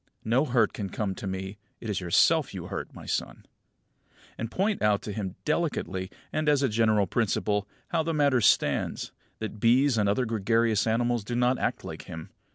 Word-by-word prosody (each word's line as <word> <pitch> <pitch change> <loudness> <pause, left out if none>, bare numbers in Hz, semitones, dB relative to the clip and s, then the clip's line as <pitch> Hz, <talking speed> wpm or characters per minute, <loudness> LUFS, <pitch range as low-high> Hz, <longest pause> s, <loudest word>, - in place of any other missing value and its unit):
No 125 +6 +3
hurt 120 -5 +2
can 100 -3 -4
come 100 0 -2
to 100 - -7
me; 95 +2 -5 0.2
it 115 - -7
is 105 -3 -1
yourself 85 -2 +3
you - - -6
hurt, - - -5
my - - -10
son." - - -3 0.9
And 115 - -4
point 200 - 0
out 105 -1 +2
to 105 - -4
him 95 -3 -4
delicately, 140 - -1 0.2
and 155 -1 +1
as 145 -2 +3
a 135 - +3
general 110 -2 +3
principle, 105 0 0 0.2
how 165 - +1
the 165 +1 -1
matter 140 -5 +3
stands; - - +2 0.3
that 110 -1 -6
bees 125 +2 +4
and 100 -1 +2
other 125 +5 +1
gregarious 115 0 +1
animals 120 0 +1
do 120 +4 -4
not 125 +1 +2
act - - -1
like - - -7
him. 80 -1 -8
115 Hz, 185 wpm, -27 LUFS, 100-125 Hz, 0.9 s, bees